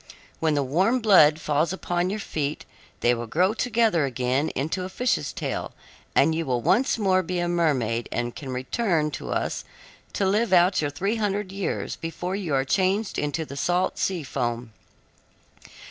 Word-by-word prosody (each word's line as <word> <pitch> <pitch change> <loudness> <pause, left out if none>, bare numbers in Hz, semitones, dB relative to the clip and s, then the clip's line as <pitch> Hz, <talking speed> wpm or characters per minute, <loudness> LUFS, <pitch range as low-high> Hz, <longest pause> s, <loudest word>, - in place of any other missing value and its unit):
When 160 -2 +1
the 145 - +1
warm 185 - +2
blood 175 -9 +6
falls 155 +2 0
upon 175 -1 -1
your 210 +2 -3
feet 150 -7 -3 0.4
they 120 - +4
will 120 -1 -4
grow 180 - +2
together 225 -7 +2
again 130 +3 0
into 155 +7 -2
a 185 - -5
fish's 250 +6 0
tail, - - -4 0.4
and 160 - +4
you 165 +1 -1
will 125 -5 0
once 235 - +2
more 190 -3 +3
be 180 0 -3
a 175 0 0
mermaid 135 -10 0
and 120 0 -2
can 140 - -7
return 150 - 0
to - - -6
us - - -2 0.5
to 200 - 0
live 210 +3 +1
out 180 0 +5
your 145 - 0
three 195 +10 -1
hundred 205 -2 -1
years 195 -1 -3
before 175 +3 -4
you 175 -8 -2
are 135 0 +1
changed 195 +7 +1
into 150 +2 -2
the 140 - -9
salt 175 +6 0
sea 180 -4 -1
foam. 120 -4 -3
170 Hz, 175 wpm, -25 LUFS, 140-195 Hz, 0.5 s, blood